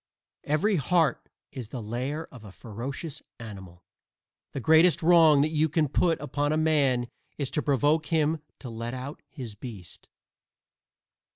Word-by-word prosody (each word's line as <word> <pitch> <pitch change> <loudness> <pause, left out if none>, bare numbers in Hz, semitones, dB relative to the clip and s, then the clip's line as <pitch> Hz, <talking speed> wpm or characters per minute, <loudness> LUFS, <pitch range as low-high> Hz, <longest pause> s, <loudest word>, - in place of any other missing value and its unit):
Every 175 +7 +2
heart 160 -1 +1 0.2
is 130 -5 -7
the 130 - -6
lair 125 +8 -3
of 125 -4 -12
a 105 - -11
ferocious 130 - -7 0.2
animal. 95 -6 -10 0.7
The - - -4
greatest 160 +5 +4
wrong 160 -4 +6
that 155 +2 +1
you 155 0 +2
can 155 0 +1
put 165 +4 +1
upon 145 0 -1
a 155 - +1
man 140 -6 +2 0.3
is 140 -3 -3
to 150 - 0
provoke 145 +3 +2
him 160 -1 +1 0.2
to 130 - -7
let 115 +2 -5
out 130 +3 -7
his 125 -7 -8
beast. 100 -5 -10
145 Hz, 150 wpm, -27 LUFS, 120-160 Hz, 0.7 s, wrong